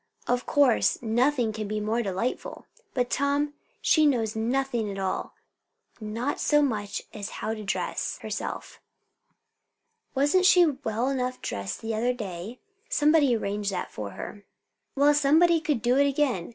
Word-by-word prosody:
Of 245 +1 0
course 280 -5 +3
nothing 240 0 +1
can 215 -1 -4
be 215 +1 -2
more 220 +3 0
delightful. 200 +4 -3 0.3
But, 245 -1 0
Tom, 285 +1 +1 0.3
she 310 -2 +5
knows 225 -6 0
nothing 240 -1 -1
at 195 - -5
all; 190 -1 -3 0.6
not 230 +6 -3
so 295 -1 +3
much 210 -7 -2
as 205 0 -5
how 220 - -2
to 215 -1 -7
dress 195 - -2
herself." - - -5 1.3
"Wasn't 290 +8 +4
she 360 -3 +7
well 255 -5 -1
enough 255 -2 -2
dressed 100 -1 -4
the 225 0 -2
other 240 +3 +1
day?" 205 +1 -6 0.3
"Somebody 295 -4 +4
arranged 205 -1 -2
that 185 - -4
for 100 -2 -6
her." 205 - -7 0.5
"Well, 285 +1 +5
somebody 315 +4 +4
could 295 -8 -1
do 250 +2 +3
it 280 0 +4
again. 265 - 0
245 Hz, 150 wpm, -27 LUFS, 215-285 Hz, 1.3 s, she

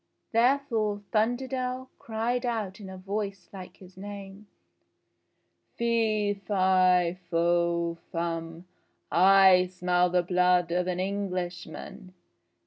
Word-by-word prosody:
Therefore 230 -4 +1
Thunderdell 255 +3 -1
cried 235 +2 -2
out 220 -6 -3
in 195 -2 -9
a 190 - -9
voice 195 -1 -5
like 185 -2 -10
his 185 -1 -16
name: 200 +1 -9 1.3
"Fee, 220 -3 +1
fi, 185 -2 +2
fo, 170 0 +1
fum! 165 0 -4 0.5
I 190 0 +6
smell 180 0 +1
the 180 0 +2
blood 180 -1 +2
of 180 +1 0
an 180 -1 -2
Englishman. 185 -1 -5
190 Hz, 100 wpm, -27 LUFS, 180-215 Hz, 1.3 s, I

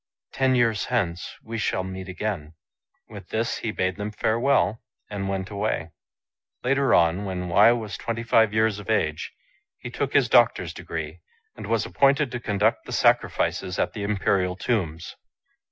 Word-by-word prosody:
Ten 130 -1 +2
years 115 -4 +2
hence 90 -8 -2
we 115 0 -5
shall 95 -3 0
meet 95 0 -7
again." 90 -5 -4 0.5
With - - -11
this 115 +1 -1
he 115 - -4
bade 95 -3 -1
them 105 0 -3
farewell, 110 -1 +1 0.3
and 100 -1 -3
went 95 +1 -3
away. 100 -5 -2 0.7
Later 135 0 +3
on, 85 +4 +3
when 90 -2 -4
Wei 100 +7 +6
was 110 -4 -4
twenty 115 0 -3
two 115 -1 +4
years 110 -1 +1
of 105 - -10
age, 80 -8 0 0.5
he 120 - -8
took 135 +3 -3
his 135 -4 +4
doctor's 120 -1 +3
degree, - - -6 0.4
and - - -8
was - - +1
appointed 140 -1 +2
to 120 - -4
conduct 105 -1 0
the - - -7
sacrifices 90 0 +1
at 90 - 0
the 105 - -6
Imperial 95 -2 0
tombs. 90 -6 -2
105 Hz, 160 wpm, -25 LUFS, 95-115 Hz, 0.7 s, Wei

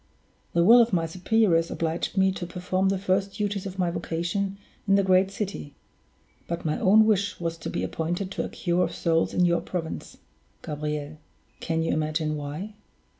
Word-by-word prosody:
The 170 - +3
will 235 +6 +8
of 230 -3 +1
my 165 -2 +2
superiors 180 0 +2
obliged 165 +4 -2
me 190 0 +4
to 180 -2 -5
perform 185 +2 -1
the 195 - +1
first 195 +1 0
duties 205 -2 -2
of 190 0 -8
my 180 -2 +1
vocation 175 +4 -2 0.3
in 195 - +5
the 200 - +4
great 190 0 +4
city; 195 -7 -5 0.7
but 170 0 -4
my 155 - 0
own 215 +3 +6
wish 205 -2 +1
was 165 -1 -2
to - - -5
be - - -2
appointed 175 +4 -3
to - - -2
a - - -5
cure 175 0 0
of - - -3
souls 165 -1 +1
in 180 - +2
your 170 -1 +2
province, 165 -3 -5 0.5
Gabriel. 150 0 -4 0.4
Can 165 0 -1
you 165 - 0
imagine 155 0 -1
why?" 150 +8 -5
180 Hz, 180 wpm, -26 LUFS, 165-195 Hz, 0.7 s, will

